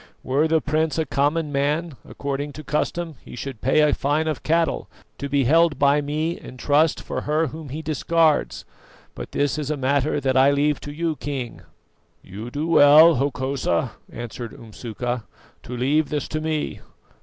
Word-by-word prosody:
Were 140 +5 +2
the 160 0 +2
prince 155 0 0
a 160 - +1
common 150 +2 0
man, 150 +4 0 0.2
according 140 +1 -4
to 155 - -9
custom 155 +2 -2
he - - -10
should 130 -2 -7
pay 135 +5 +3
a 150 -1 +4
fine 150 +3 0
of 155 - -2
cattle 165 +1 0 0.3
to 140 - -4
be 140 0 +2
held 160 +3 +4
by 140 +1 +3
me 155 +4 -2
in 130 - -11
trust 150 +4 +2
for - - -4
her 155 +2 +1
whom 155 0 -7
he 155 +4 -6
discards; 160 0 +1 0.5
but - - -8
this 145 +1 0
is 150 -2 -3
a 155 - -1
matter 140 +2 +1
that 130 -2 0
I 135 +1 +6
leave 145 +1 +1
to 145 - -7
you, 160 0 -2
King." 135 -5 -5 0.6
"You 105 +5 -8
do 145 +5 -3
well, 155 0 +7
Hokosa," 130 - -1 0.2
answered 120 0 -7
Umsuka, 115 +1 -5 0.4
"to 125 - -7
leave 145 +4 +1
this 150 -2 -2
to 155 - -2
me. 155 -1 -2
145 Hz, 175 wpm, -23 LUFS, 135-155 Hz, 0.6 s, well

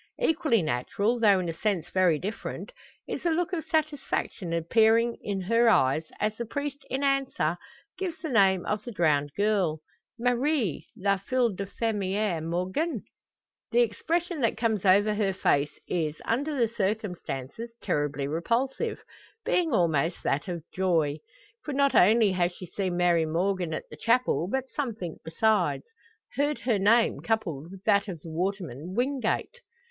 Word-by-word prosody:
Equally 315 - +2
natural, 200 - 0
though 205 -4 +5
in 180 - -2
a 165 - -2
sense 175 -2 -1
very 185 -4 +3
different, 205 - -5 0.4
is - - -4
the 345 - +1
look 345 +3 0
of 325 -3 -1
satisfaction 290 - -2
appearing 225 +8 +3
in 195 -2 -3
her 230 +5 +3
eyes, 145 -4 +3
as 215 +1 0
the 235 - -3
priest 285 +2 -4
in 265 +2 -2
answer 270 - +1 0.4
gives 355 -4 -3
the 320 - -5
name 195 -6 +4
of 210 0 -2
the 240 - -6
drowned 150 -7 +1
girl. 200 -7 +1 0.4
"Marie, 245 - 0
la 200 +1 +2
fille 240 +2 +1
de 195 +1 -5
fermier 200 -4 -1
Morgan." 185 - -2 0.7
The 240 0 +4
expression 325 - -1
that 230 - +1
comes 220 -4 0
over 205 +3 +5
her 205 -2 0
face 145 -6 +1
is, 160 -3 -2
under 285 +5 -1
the 235 - +4
circumstances, 205 - -3
terribly 145 -1 -1
repulsive 240 - -1 0.4
being 340 -3 +1
almost 170 - +1
that 145 +7 0
of 170 -3 -4
joy! 165 -6 +1 0.4
For 295 - -4
not 280 0 +3
only 215 +2 +5
has 180 -1 +1
she 180 - -9
seen 185 0 -3
Mary 170 -2 +3
Morgan 180 +1 0
at 155 - -4
the 150 - -9
chapel, 230 -2 +2
but 265 +5 -2
something 225 - -4
besides 215 +7 +1 0.5
heard 290 +1 0
her 235 -5 +1
name 225 +4 +4
coupled 175 -10 -2
with 195 0 -12
that 205 -1 +3
of 175 -6 -6
the 165 - -9
waterman, 180 -2 -3
Wingate. 265 - -1
205 Hz, 155 wpm, -27 LUFS, 175-240 Hz, 0.7 s, though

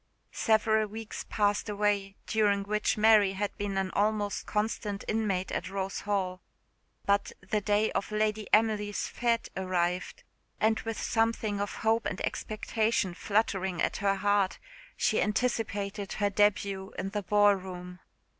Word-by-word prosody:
Several 220 -1 +2
weeks 220 +1 -7
passed 205 0 +1
away, 205 -1 0
during 205 -2 +2
which 210 +2 0
Mary 210 -2 +5
had 200 +1 -3
been 200 -1 -2
an 190 -1 -1
almost 205 0 0
constant 210 -1 -2
inmate 200 -4 0
at - - -3
Rose 195 0 -3
Hall; 190 -3 -2 0.6
but 200 0 +2 0.2
the 215 -1 0
day 210 +2 +2
of 200 - -2
Lady 215 0 0
Emily's 210 -2 +2
_fête 235 -1 +1
_arrived, 180 -1 -1 0.4
and 220 0 +2
with 225 -1 -4
something 225 -2 0
of 205 - -3
hope 225 +1 +3
and 195 - -4
expectation 215 -3 -1
fluttering 190 -2 0
at - - 0
her 200 -1 +1
heart, 200 0 +1 0.4
she - - +2
anticipated 210 -3 -1
her 205 -1 0
debut 200 -1 +1
in 195 - -2
the 205 0 -2
ball 205 +2 +5
room. 180 -1 -7
205 Hz, 140 wpm, -29 LUFS, 195-215 Hz, 0.6 s, Mary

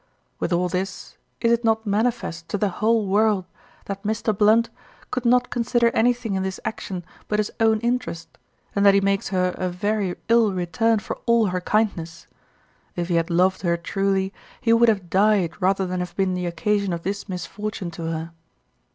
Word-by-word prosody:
With - - -2
all 175 +1 +2
this 185 +2 -4 0.3
is 230 - +3
it 235 +1 +2
not 220 0 +1
manifest 205 -6 -1
to - - -1
the 205 0 +1
whole 225 0 +3
world 205 -1 +2 0.4
that 195 0 -5
Mr. 220 +1 -1
Blunt 220 +3 +4 0.4
could 250 -1 -2
not 250 +1 +3
consider 235 0 +2
anything 240 -2 +1
in 190 - 0
this 190 0 -3
action 185 -5 -4 0.2
but 210 - 0
his 210 -1 0
own 220 -1 +3
interest, 235 -8 -3 0.4
and 200 - +2
that 200 -1 +7
he - - +6
makes 195 0 0
her 185 -1 +1
a 185 - 0
very 195 +1 -1
ill 230 -3 +4
return 185 +6 +1
for 205 - -5
all 235 -1 +4
her 180 0 -2
kindness; 180 -5 -1 0.7
if 175 0 -3
he - - +1
had 165 -1 +1
loved 185 +2 +2
her 170 -2 +1
truly 195 +2 -1 0.3
he 230 -2 +3
would 230 0 +5
have 195 -6 -1
died 195 -3 +2
rather 190 +1 +2
than 180 0 -3
have 180 0 -5
been 190 -2 +1
the 180 -1 -2
occasion 200 +2 0
of 170 -1 -4
this 200 +1 -4
misfortune 185 +1 -5
to 165 -1 -5
her. 165 0 -4
200 Hz, 185 wpm, -23 LUFS, 180-220 Hz, 0.7 s, that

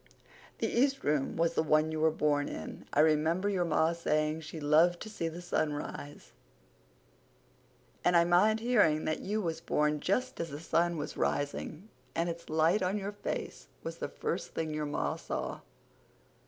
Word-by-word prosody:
The - - -1
east 270 +3 +1
room 145 -2 0
was 165 0 +2
the - - +2
one 155 0 +3
you 155 - -2
were 160 +1 +4
born 150 -2 +1
in. 80 - -7
I 150 - +4
remember 160 +5 +3
your 185 -3 +1
ma 160 0 +2
saying 155 -1 0
she 160 +1 -7
loved 160 +4 +4
to 220 - -6
see 170 -5 -2
the 170 +2 -6
sunrise; 150 -3 -3 1.7
and 175 -1 +5
I 170 - +6
mind 205 +6 +4
hearing 165 -11 +3
that 155 - -1
you 210 +2 -2
was 165 -2 -2
born 150 0 +1
just 255 - -1
as 165 - -2
the 145 - -6
sun 170 +1 +1
was 145 - -5
rising 155 +6 -2 0.3
and 170 +1 0
its 170 0 -7
light 160 +5 +3
on 185 +3 0
your 200 0 -3
face 205 - -5 0.2
was - - -5
the - - -4
first - - -4
thing 160 -1 -2
your 150 -1 -2
ma 145 - -1
saw." - - -4
165 Hz, 175 wpm, -31 LUFS, 155-180 Hz, 1.7 s, I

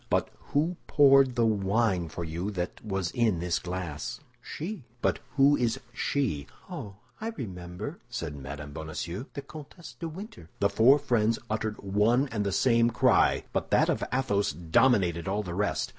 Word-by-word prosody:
"But - - +1 0.2
who 165 +5 +1
poured 135 -3 +6
the 120 -2 +3
wine 100 -4 +1
for 85 - -5
you 85 +4 -3
that 90 -1 -4
was 95 -5 -2
in 115 -6 +2
this 85 0 0
glass?" 90 -4 -5 0.2
"She." 175 -1 -6 0.2
"But - - +1 0.2
who 140 +1 +6
is 120 -4 0
she?" 120 - -1 0.2
"Oh, 100 -2 -6 0.3
I 220 - -2
remember!" 95 - -6
said 85 -11 -4
Mme. 70 +1 -7
Bonacieux, 80 - -5
"the 140 - -5
Comtesse 155 +4 -11
de 165 - -3
Winter." 170 - -9
The 100 - +3
four 125 +8 +6
friends 115 -6 +1
uttered 110 -1 -2
one 105 +7 +3
and 105 -4 -1
the 100 - -1
same 115 +2 +4
cry, 115 - +3
but - - -1
that - - +4
of - - 0
Athos 105 - +1
dominated 85 - +2
all 100 +2 0
the 90 -3 -5
rest. 100 +3 0
105 Hz, 165 wpm, -28 LUFS, 90-130 Hz, 0.3 s, poured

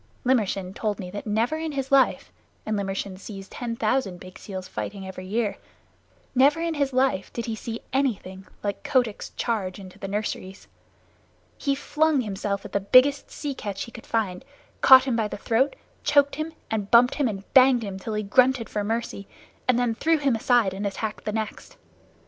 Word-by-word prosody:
Limmershin 200 -7 +1
told 210 0 -2
me 180 -2 -6
that 205 +2 -6
never 230 +9 +1
in 320 -1 -3
his 270 -1 -3
life 275 -1 +3 0.3
and 215 - -1
Limmershin 195 -1 -3
sees 195 -1 -8
ten 235 +2 -5
thousand 215 -5 0
big 185 0 -12
seals 190 -2 -7
fighting 195 -1 -5
every 185 0 -8
year 210 0 -1 0.8
never 275 +5 +4
in 335 0 -1
all 300 - -6
his 280 -1 +1
little 260 +1 +4
life 190 -7 -5
did 235 - -3
he 225 - -3
see 230 +1 -6
anything 195 -8 -1 0.2
like 200 -1 -2
Kotick's 245 -6 0
charge 205 -6 -1
into 190 -1 -12
the 195 - -5
nurseries. 195 -1 -4 0.9
He 275 -2 0
flung 300 0 +1
himself 200 -2 -3
at - - -8
the 200 - +1
biggest 255 +8 +4
sea 290 -2 -4
catch 205 -6 -5
he 235 - -10
could 235 - -11
find, 215 -3 -1 0.4
caught 260 -1 +9
him 260 -3 0
by 220 -2 +1
the - - -6
throat, 235 +7 +1 0.3
choked 285 -1 +4
him 310 +1 -3 0.2
and 210 -2 -2
bumped 240 +2 +6
him 285 -3 +1
and 200 -3 -4
banged 255 -2 +6
him 195 -2 -5
till 215 +3 -4
he 215 - -1
grunted 250 +3 +3
for 210 - -1
mercy, 220 -2 -3 0.4
and 255 -2 +4
then 245 -2 +1
threw 325 +8 +2
him 280 -5 +1
aside 225 -3 +3
and 200 +2 -2
attacked 215 +2 -4
the 210 - -1
next. 220 - -5
225 Hz, 195 wpm, -25 LUFS, 200-260 Hz, 0.9 s, caught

